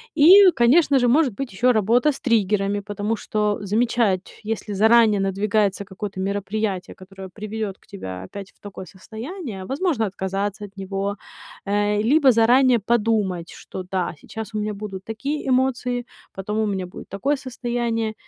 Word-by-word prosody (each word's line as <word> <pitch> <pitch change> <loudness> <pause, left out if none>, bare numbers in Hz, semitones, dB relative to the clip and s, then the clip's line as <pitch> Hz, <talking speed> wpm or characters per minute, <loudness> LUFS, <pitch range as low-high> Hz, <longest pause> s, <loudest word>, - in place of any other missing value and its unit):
И, 370 +5 +8
конечно 270 +3 +4
же, 245 - +2
может 265 -2 +3
быть 270 +3 -5
ещё 245 +6 +3
работа 235 +7 +3
с - - -9
триггерами. 205 -3 +1
Потому 205 +2 -3
что 210 -1 -1
замечать, 210 -2 0
если 215 -1 -4
заранее 220 0 +5
надвигается 200 +1 0
какое-то 195 0 -7
мероприятие, 200 0 -2
которое 190 0 -11
приведёт 215 -2 -5
к - - -28
тебя 95 - -7
опять 195 - -9
в - - -36
такое 200 -2 -9
состояние, 220 - -8
возможно 275 - 0
отказаться 195 +2 -3
от 200 0 -16
него. 195 +1 -3 0.5
Э, 205 +1 +1
либо 290 -4 +6
заранее 245 +2 +4
подумать, 210 -6 0
что, 185 - -8
да, 185 -2 -1
сейчас 220 0 -8
у 215 - -2
меня 210 0 -2
будут 195 -2 -7
такие 275 +7 -4
эмоции, 250 -1 0 0.3
потом 210 +3 -3
у 215 - +1
меня 190 -2 -2
будет - - -11
такое 275 +10 0
состояние, 235 -3 -2
215 Hz, 155 wpm, -22 LUFS, 195-240 Hz, 0.5 s, И